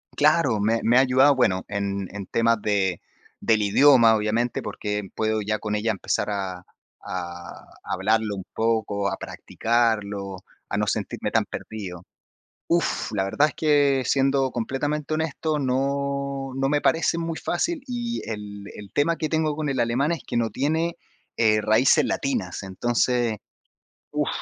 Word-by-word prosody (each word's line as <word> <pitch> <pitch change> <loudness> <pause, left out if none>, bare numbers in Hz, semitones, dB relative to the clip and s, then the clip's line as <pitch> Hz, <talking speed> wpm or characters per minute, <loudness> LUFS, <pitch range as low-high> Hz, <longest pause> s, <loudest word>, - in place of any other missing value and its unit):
Claro, 150 -6 +3
me 115 +2 +2
me 120 +2 +4
ha - - +8
ayudado, 135 +2 +5
bueno, 95 -8 +2
en 100 -1 -2
en 100 - -5
temas 115 -2 +2
de 95 -4 0 0.4
del 110 -2 +3
idioma, 115 +1 +6
obviamente, 110 +3 0
porque 105 -2 -4
puedo 110 0 0
ya 105 +1 -1
con 105 0 -2
ella 110 +2 0
empezar 105 +1 -1
a 95 -3 -3 0.4
a 85 -1 -6 0.2
hablarlo 105 +2 0
un 95 -2 -7
poco, 105 -3 0
a 95 - -3
practicarlo, 105 -4 -1 0.3
a - - -1
no - - 0
sentirme - - -2
tan - - +2
perdido. 95 -5 -7 0.6
Uf, 170 0 0
la 95 -2 +1
verdad 140 +10 +2
es - - -12
que 145 -3 +3
siendo 135 0 +2
completamente 145 +6 -2
honesto, 155 0 -1
no 140 +1 -1
no 135 0 0
me 145 0 +1
parece 165 +1 +2
muy 165 -1 -3
fácil, 315 - -1
y 240 -2 -3
el 105 -2 -6
el 100 -2 -10
tema 165 +3 +2
que 155 -1 -2
tengo 155 -2 0
con 150 -1 -2
el 130 -2 -1
alemán 125 +7 +1
es 170 - -3
que - - -2
no 115 -1 +1
tiene, 160 +8 -1 0.4
eh, 110 -2 +3
raíces 110 +6 +4
latinas. 100 -10 -2
Entonces, 120 +3 0 0.7
uf, - - 0
115 Hz, 155 wpm, -24 LUFS, 105-140 Hz, 0.7 s, ha